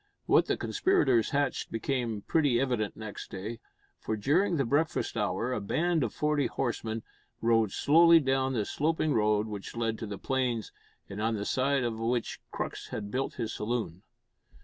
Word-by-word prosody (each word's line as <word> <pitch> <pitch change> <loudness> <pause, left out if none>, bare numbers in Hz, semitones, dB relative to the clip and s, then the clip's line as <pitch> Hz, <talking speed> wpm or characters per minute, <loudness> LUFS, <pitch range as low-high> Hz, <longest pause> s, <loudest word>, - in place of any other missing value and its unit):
What - - +4
the - - 0
conspirators 130 - +2
hatched 145 0 -1
became 115 -2 -2
pretty 145 -7 +2
evident 120 -6 -1
next 110 -2 -7
day, 105 +5 -6 0.4
for, 110 - -3
during 165 - +2
the 135 - +1
breakfast 145 +3 0
hour, 115 +3 -1
a 105 - -2
band 160 - +1
of - - -1
forty 150 -2 +1
horsemen 115 -3 -3 0.4
rode 115 -3 +3
slowly 165 - +6
down 135 -2 +1
the 110 -4 0
sloping 155 +3 0
road 105 -1 +2
which 105 -1 -7
led 115 -1 -1
to 110 - -5
the 100 -1 -5
plains, 125 -3 -1 0.4
and 100 +2 -6
on 110 +1 +1
the 100 -1 -3
side 135 +2 +1
of 115 -2 -2
which 115 +1 -1
Crux - - -5
had 105 -1 -5
built 130 +3 -2
his 115 -3 -3
saloon. 105 -6 -3
120 Hz, 170 wpm, -29 LUFS, 110-140 Hz, 0.4 s, slowly